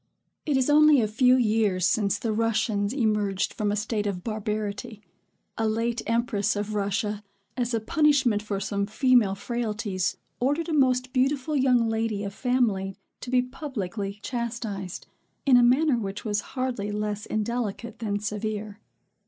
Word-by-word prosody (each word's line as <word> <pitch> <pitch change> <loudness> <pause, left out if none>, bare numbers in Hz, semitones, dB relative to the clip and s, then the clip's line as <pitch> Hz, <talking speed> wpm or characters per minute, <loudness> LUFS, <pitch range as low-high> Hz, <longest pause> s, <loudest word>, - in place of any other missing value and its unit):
It 290 -3 +2
is 260 - +2
only 300 -1 +6
a 220 - +2
few 250 +4 +4
years 215 -6 +2
since 200 0 +2
the 225 -2 -2
Russians 215 -2 0
emerged 210 -6 0
from 210 -1 -1
a - - 0
state 210 0 -1
of 180 -3 -3
barbarity. 215 -1 -4 0.6
A 225 - +2
late 230 +2 -1
empress 230 -2 +1
of 205 +1 -3
Russia, 205 +1 -1 0.3
as 245 -1 -1
a - - +1
punishment 265 -3 +2
for 205 -2 -3
some 200 0 -2
female 230 -3 +3
frailties, 210 -4 -2 0.2
ordered 290 +7 0
a - - -1
most 255 -3 +2
beautiful 270 +3 +1
young 250 -4 +3
lady 225 -2 -1
of 200 -1 -5
family 215 -6 0 0.2
to 250 - -8
be 250 0 +3
publicly 210 - -5
chastised, 230 -6 -4 0.4
in 270 -3 +6
a 245 - +7
manner 255 +2 +4
which 200 -1 -5
was 210 -1 0 0.2
hardly 240 -6 -2
less 210 0 -3
indelicate 225 0 -3
than 210 -3 -1
severe. 210 0 -4
220 Hz, 155 wpm, -26 LUFS, 205-250 Hz, 0.6 s, a